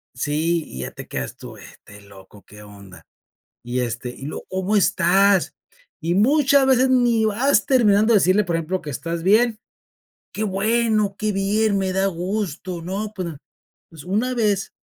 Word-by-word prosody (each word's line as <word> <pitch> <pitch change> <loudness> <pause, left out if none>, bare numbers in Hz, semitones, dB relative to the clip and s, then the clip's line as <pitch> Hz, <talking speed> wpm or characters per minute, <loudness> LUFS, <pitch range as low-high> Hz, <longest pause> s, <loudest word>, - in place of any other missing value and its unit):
Sí, 155 +5 -1
y 65 - -9
ya 65 - -5
te - - -11
quedas 65 -2 -5
tú, - - -11
este 105 0 -15
loco, 100 0 -17
¿qué 105 +1 -14
onda?, 100 -2 -14 0.6
y 120 +1 -2
este, 120 0 -4
y 135 +2 -9
luego, 150 - -7
¿cómo 190 +3 -1
estás?, 195 0 +3 0.5
y 170 +1 -1
muchas 275 +5 +3
veces 260 0 +3
ni 240 -3 +2
vas 225 +3 +2
terminando 220 -5 +3
de - - +7
decirle, 185 +4 +3
por 170 - -3
ejemplo, 165 +3 -2
que 150 - -7
estás 165 +5 -5
bien, 220 +3 +3 0.8
qué 215 - -3
bueno, 215 0 0
qué 215 -1 0
bien, 200 +1 0
me 190 -1 -1
da 190 +1 +1
gusto, 180 -1 -4
¿no?, 200 +5 -5
pues, 185 -3 -4 0.6
pues, 160 -3 -12
una 215 +8 -1
vez 210 -5 -1
195 Hz, 165 wpm, -21 LUFS, 165-215 Hz, 0.8 s, de